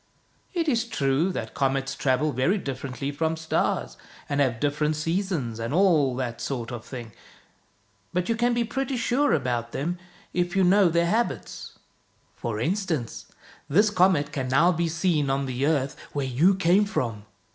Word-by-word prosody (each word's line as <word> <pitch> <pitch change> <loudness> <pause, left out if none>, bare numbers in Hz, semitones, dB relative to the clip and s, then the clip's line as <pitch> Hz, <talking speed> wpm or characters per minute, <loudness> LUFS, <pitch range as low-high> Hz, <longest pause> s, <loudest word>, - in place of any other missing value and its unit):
It 335 -2 0
is 235 -5 +2
true 145 -2 +1
that - - -5
comets 135 0 0
travel 135 +2 +1
very 135 - +1
differently 135 -3 -4
from 160 +2 -1
stars, 160 - -1 0.3
and 145 0 0
have 125 -4 +1
different 150 +2 0
seasons, 165 - -2
and 115 +6 -2
all 160 -9 +4
that 125 -2 -4
sort 120 -4 -3
of 120 -2 -6
thing. 120 -4 -8 1.0
But 180 0 -1
you 230 - +1
can 240 +1 +1
be 240 - +2
pretty 265 +2 -2
sure 265 +5 +2
about 120 -4 -1
them 170 +6 -2 0.3
if 175 +1 -1
you 190 - +4
know 190 0 +5
their 170 +1 +2
habits. 170 - -2 0.6
For 110 -2 -4
instance, 155 - -2 0.4
this 205 +8 +4
comet 180 -7 +3
can 135 -4 -3
now 135 +8 +4
be 170 -1 0
seen 165 -3 +1
on 135 +1 0
the 130 +2 -1
earth 140 -3 0 0.2
where 140 -2 -1
you 150 +10 +3
came 190 +2 +3
from. 115 - -3
150 Hz, 165 wpm, -25 LUFS, 130-185 Hz, 1.0 s, know